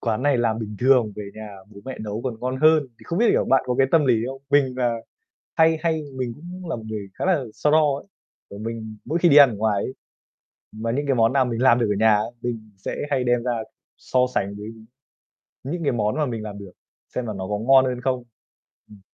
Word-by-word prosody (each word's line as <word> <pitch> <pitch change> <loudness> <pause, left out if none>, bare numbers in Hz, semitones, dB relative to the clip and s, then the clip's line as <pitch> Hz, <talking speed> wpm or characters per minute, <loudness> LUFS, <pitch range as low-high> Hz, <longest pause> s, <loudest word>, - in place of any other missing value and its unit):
"Quán 115 0 -1
này 140 -3 +2
làm 115 -2 +1
bình 105 -2 -6
thường 125 -4 +3
về 105 -1 -6
nhà 105 -2 -9
bố 100 -1 -13
mẹ 130 -1 -7
nấu 105 +1 -4
còn 120 -3 -4
ngon 130 +1 -2
hơn." 155 -1 +5 0.2
Thì - - -18
không 170 - -3
biết, 235 - +4
kiểu, - - +2
bạn 135 - +3
có 125 - 0
cái 135 - +5
tâm 160 -3 +5
lý 125 - +5
không? 135 0 -8
Mình 135 -3 +3
là 120 -2 +1 0.6
hay 160 0 +4
hay 160 -2 0
mình 125 -2 -3
cũng 175 +2 -9
là - - -1
một 115 - -9
người 105 -2 -5
khá - - -4
là 180 -8 +2
so 150 - 0
đo 150 -3 +4
ấy, 145 - -12 0.4
kiểu, 100 - -9
mình 110 -1 -6
mỗi 165 - -1
khi 175 - +4
đi 145 - +6
ăn 140 -3 +9
ở 110 - -5
ngoài 105 -1 0
ấy, 130 - -4 0.8
mà 115 +1 -3
những 145 +4 -1
cái 135 - +2
món 115 +1 +3
nào 135 -2 +3
mình 120 -1 -3
làm 125 -2 +5
được 115 - +1
ở 105 - +1
nhà 110 -1 +5
á, 105 - +1 0.2
mình 110 -3 -5
sẽ 95 - -5
hay 135 -3 +1
đem 120 -1 +1
ra 125 - 0 0.4
so 130 - -1 0.2
sánh 100 -3 -1
với 105 - -8 1.0
những 165 +6 -4
cái 140 - +1
món 105 -2 0
mà 150 -2 +1
mình 115 -3 -4
làm 105 -1 -7
được, 100 -2 -10 0.4
xem 125 -2 -2
là 110 - -3
nó 95 -1 -4
có 105 - -1
ngon 130 +4 +5
hơn 125 -1 -2
không. 130 -1 -1 0.7
Ừm. 105 -2 -15
125 Hz, 250 wpm, -23 LUFS, 110-140 Hz, 1.0 s, ăn